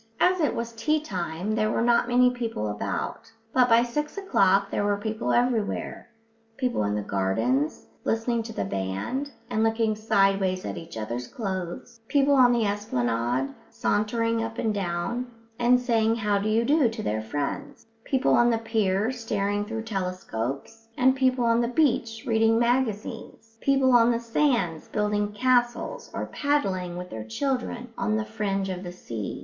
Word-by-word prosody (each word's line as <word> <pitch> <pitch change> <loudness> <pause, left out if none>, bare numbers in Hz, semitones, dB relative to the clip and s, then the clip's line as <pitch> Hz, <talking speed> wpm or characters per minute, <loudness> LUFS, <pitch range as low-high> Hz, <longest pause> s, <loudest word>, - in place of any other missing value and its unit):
As 370 0 +3
it 305 - +1
was 235 0 -4
tea 305 +7 +1
time 180 - -3
there 215 -1 +1
were 225 - 0
not 235 0 +3
many 250 +1 +4
people 230 - -3
about; 105 0 -4 0.2
but 250 -1 +4
by 230 +1 +6
six 295 +8 -3
o'clock 195 - +2
there - - 0
were 205 0 +1
people 215 +2 -2
everywhere 240 -3 0 0.5
people 250 - 0
in 105 0 0
the 105 - -2
gardens, 110 +10 0 0.2
listening 230 +1 0
to 225 0 -7
the 100 - -2
band, 100 - -3 0.2
and 220 - +1
looking 225 -1 +2
sideways 195 -3 +1
at - - -4
each 165 -8 -8
other's 120 +3 -4
clothes; 190 -1 -5
people 285 0 +3
on 255 -3 +6
the 235 -2 +2
esplanade, 130 - -1 0.2
sauntering 230 +2 0
up 225 0 -5
and 220 -3 0
down, 195 +6 -2 0.3
and 245 +1 +5
saying 230 -2 +2
how 210 -3 +1
do 210 +2 -1
you 225 +2 +2
do 285 -2 +4
to 225 -1 -6
their 110 +1 -1
friends; 145 - -4 0.2
people 265 0 +1
on 240 0 +5
the 230 - +2
pier 220 -1 0
staring 205 -4 -1
through 225 +1 -4
telescopes, 185 - -4
and 260 +1 +4
people 255 -2 +2
on 230 0 +3
the 235 - +1
beach 240 -5 +1
reading 225 -1 +3
magazines, 235 -2 -1
and 225 - -35
people 270 -1 +3
on 235 -1 +6
the 235 -1 +1
sands 230 - 0
building 210 0 0
castles 245 - 0
or - - -3
paddling 190 - -1
with 180 0 -7
their 110 -1 -5
children 250 - -3
on 215 0 +1
the 215 - -2
fringe 200 -3 -2
of 185 -1 -4
the 175 - -6
sea. 115 - -6
225 Hz, 170 wpm, -26 LUFS, 185-240 Hz, 0.5 s, by